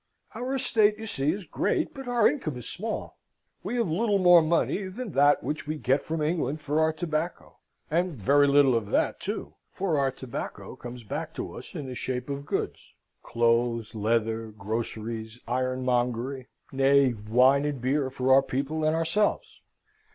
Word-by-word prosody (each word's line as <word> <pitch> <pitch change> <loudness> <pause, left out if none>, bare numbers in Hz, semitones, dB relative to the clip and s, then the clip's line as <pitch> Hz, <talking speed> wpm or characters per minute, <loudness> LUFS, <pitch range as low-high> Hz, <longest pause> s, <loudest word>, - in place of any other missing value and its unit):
"Our 250 +4 -3
estate, 220 -5 +2
you 220 - -7
see, 145 -8 0
is 195 +2 -5
great, - - -1
but 270 -2 -8
our 240 -3 +4
income 155 - -2
is 125 - -8
small. 220 +4 -5 0.4
We - - -4
have 235 -4 +1
little 205 +5 +1
more 175 -2 +7
money 170 +4 +1
than 215 +3 -6
that 145 +1 +4
which 150 -1 -4
we 155 +1 -2
get 135 -1 +1
from 160 -1 -3
England 155 -2 -1
for 150 +1 -1
our 160 0 +3
tobacco 160 +1 -4 0.3
and 175 0 +1
very 140 +6 +4
little 140 -2 +5
of 115 -3 0
that - - +1
too - - -5 0.2
for 175 -6 -1
our 135 -1 +2
tobacco 130 -2 -7
comes 120 0 -9
back 105 - -5
to - - -5
us - - -10
in 145 - -4
the 130 - -6
shape 125 +2 -4
of 140 +1 -5
goods, - - -4 0.3
clothes, 115 -1 +1
leather, 115 +1 0
groceries, 110 +1 -5
ironmongery, 125 0 -1 0.2
nay, 135 -1 +4
wine 125 +6 +3
and 145 -3 -2
beer 130 +2 0
for 130 0 +2
our 135 - +7
people 140 +4 -2
and 155 +1 +2
ourselves. 165 +6 0
140 Hz, 170 wpm, -27 LUFS, 125-165 Hz, 0.4 s, more